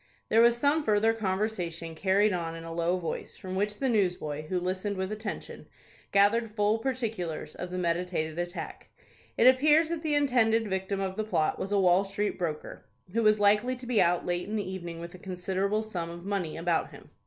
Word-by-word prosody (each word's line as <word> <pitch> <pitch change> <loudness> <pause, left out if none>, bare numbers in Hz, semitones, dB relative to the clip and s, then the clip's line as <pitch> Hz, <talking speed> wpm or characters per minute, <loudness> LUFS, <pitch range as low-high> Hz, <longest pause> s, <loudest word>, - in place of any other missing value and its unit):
There 225 - +5
was 235 0 +5
some 290 +5 +2
further 220 -1 +3
conversation 190 -5 -2
carried 195 +5 +2
on 165 -2 -3
in 165 - -8
a 165 0 -7
low 170 +2 +1
voice, 170 -3 -5
from 185 -1 -7
which 205 +2 -1
the 270 - 0
newsboy, 180 - 0
who 180 +2 0
listened 185 +3 -2
with 190 +1 -2
attention, 215 0 -6 0.4
gathered 215 +3 +4
full 210 +1 +2
particulars 225 -10 -3
of 180 - -6
the 180 - -4
meditated 170 -2 -1
attack. 175 +1 -5 0.5
It 230 - +4
appears 300 +5 +5
that 335 -2 -3
the 310 -2 +1
intended 230 -6 +3
victim 190 0 -2
of 190 -1 -3
the 215 - 0
plot 160 -8 0
was 195 - -4
a 205 - +3
Wall 185 0 +4
Street 200 +1 -2
broker, 160 -4 -4 0.3
who 230 - +2
was 215 -1 +4
likely 210 +5 +3
to 250 0 -10
be 240 -3 +2
out 175 0 +2
late 175 +2 -2
in 215 - -2
the 205 -3 -2
evening 175 -3 -6
with 170 +1 -8
a 185 - -11
considerable 190 +3 -1
sum 175 -6 -4
of 170 +1 -9
money 195 -6 -2
about 165 0 0
him. - - -15
195 Hz, 200 wpm, -29 LUFS, 175-220 Hz, 0.5 s, There